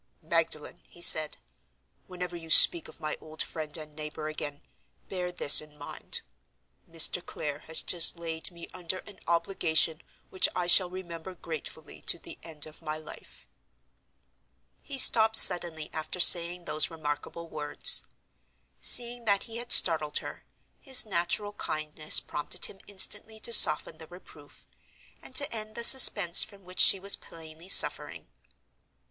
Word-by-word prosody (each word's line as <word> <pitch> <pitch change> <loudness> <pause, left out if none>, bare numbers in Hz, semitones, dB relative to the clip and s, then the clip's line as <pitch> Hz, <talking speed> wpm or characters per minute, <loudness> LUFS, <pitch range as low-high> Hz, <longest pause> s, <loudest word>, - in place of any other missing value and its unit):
"Magdalen!" 160 -1 -4
he - - -17
said; 155 -3 0 0.7
"whenever 180 -1 -9
you 165 -1 -12
speak 165 +1 +9
of - - -17
my 155 0 -6
old 155 0 -8
friend 155 -1 -8
and 155 -1 -14
neighbor 155 0 -9
again, 145 -2 -9 0.5
bear 180 -2 -7
this 150 -5 +4
in 150 -1 -18
mind: 145 - -11 0.7
Mr. 165 +2 0
Clare 145 -1 -8
has 160 0 -1
just 175 -1 0
laid 165 -1 -7
me 170 -2 -14
under 180 0 -5
an 205 -2 -16
obligation 170 -2 -2 0.3
which 185 - 0
I 180 - -4
shall 180 +1 +3
remember 180 -1 -11
gratefully 160 -2 -11
to - - -1
the - - -14
end 155 -3 -11
of 155 +1 -16
my 155 -1 -7
life." 155 -1 -16 1.3
He 280 - -8
stopped 220 -3 +5
suddenly 170 -4 +3
after 155 +3 -8
saying 175 0 +3
those 155 - 0
remarkable 160 +1 -9
words. 150 -2 +1 0.8
Seeing 240 0 0
that 200 -2 -1
he 230 -1 -11
had 240 +1 -8
startled 155 -3 +4
her, - - -11 0.3
his 265 -4 +2
natural 195 +2 -5
kindness 155 -4 -2
prompted 160 +4 -4
him 195 - -12
instantly 210 +2 -1
to 235 - -1
soften 160 -5 +4
the 160 - -14
reproof, 160 -4 -19 0.6
and 260 - -16
to 280 +1 +2
end 215 -1 -9
the 235 - -7
suspense 205 -9 +6
from 200 -1 -15
which 185 0 -13
she 195 - +3
was 200 +1 +3
plainly 165 +2 -17
suffering. - - +3
170 Hz, 150 wpm, -25 LUFS, 155-190 Hz, 1.3 s, speak